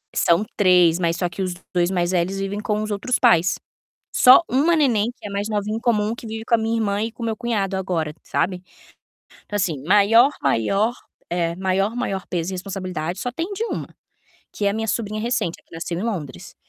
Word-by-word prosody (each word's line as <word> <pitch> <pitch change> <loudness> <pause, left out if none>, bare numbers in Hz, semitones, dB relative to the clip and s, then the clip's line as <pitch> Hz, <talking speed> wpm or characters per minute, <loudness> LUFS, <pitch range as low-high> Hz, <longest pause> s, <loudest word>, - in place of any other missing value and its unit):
são 170 +5 +3
3, 180 -3 +5
mas 170 -1 +1
só 180 -2 -1
que 180 +3 -6
os 185 -1 -1 0.2
2 175 0 +2
mais 175 -1 0
velhos 185 +2 0
vivem 195 +1 -3
com 210 0 -1
os 215 - -4
outros 220 +5 0
pais, 175 +1 +4 0.6
só 255 +6 +8
1 295 +7 +3
neném, 240 -7 +2
que - - -9
é - - -9
mais 200 +2 -2
novinha 210 +1 -1
em - - -10
comum, 220 -2 +1
que 235 - -10
vive 220 0 -5
com 235 - +2
a - - -5
minha 225 +1 -1
irmã 205 -2 0
e 225 0 -3
com 235 - -11
meu 220 -1 -1
cunhado 205 -5 -1
agora, 165 -5 -2
sabe. 180 0 -1 0.8
Então, 205 - -4
assim, 165 -8 -1
maior, 215 - +5
maior 195 - +1 0.4
é, 170 -1 0
maior, 190 +3 0
maior 195 -6 -3
peso 175 +1 -2
e - - -3
responsabilidade 185 -2 -4
só 245 - -2
tem 335 +9 -4
de 440 - -3
1, - - -4 0.7
que 205 - -2
é - - +4
a - - -1
minha 225 0 -2
sobrinha 215 -1 -2
recente, 230 -8 -1
a - - -49
que - - -20
nasceu 170 +1 -4
em - - -3
Londres. 165 - -5
200 Hz, 215 wpm, -22 LUFS, 180-225 Hz, 0.8 s, só